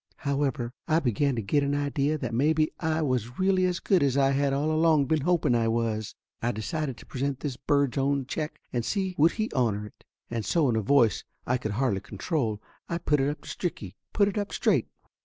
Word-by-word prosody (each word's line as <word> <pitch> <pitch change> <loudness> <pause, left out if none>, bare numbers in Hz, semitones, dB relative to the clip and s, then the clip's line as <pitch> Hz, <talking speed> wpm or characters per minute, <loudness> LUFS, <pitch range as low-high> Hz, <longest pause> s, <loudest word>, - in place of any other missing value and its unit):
However, 135 -4 -1
I 155 - +3
begun 135 0 +1
to 115 - -2
get 145 +9 +2
an 140 0 0
idea 145 +1 0
that 130 -6 -4
maybe 155 +5 +2
I 160 -1 0
was 125 -4 -1
really 185 -1 +3
as 180 -1 0
good 185 -1 +2
as 140 -1 +2
I 135 -1 +4
had 140 0 +1
all 145 +3 0
along 155 -2 +4
been 155 +2 +1
hoping 170 -4 +2
I 115 -1 +2
was. 115 -2 -1 0.3
I 120 - +1
decided 135 - -3
to - - -13
present 135 0 -3
this 140 -4 -3
bird's 140 0 +1
own 140 0 +1
check 150 +4 -4
and 120 -2 0
see 190 - -1
would 160 +3 +5
he 220 0 -2
honor 110 -6 0
it; 105 - -15 0.3
and 115 -2 -2
so 155 - +2
in 115 - +1
a 110 - +1
voice 115 -2 +3 0.2
I 125 - +1
could 110 -4 -3
hardly 110 -4 +1
control 115 - -2 0.3
I 170 - -1
put 150 -3 +1
it 135 +1 +2
up 150 - -5
to - - -14
Stricky 175 -1 -4 0.2
put 200 -2 +3
it 205 +1 -1
up 205 - -3
straight. - - +1
140 Hz, 220 wpm, -27 LUFS, 120-155 Hz, 0.3 s, would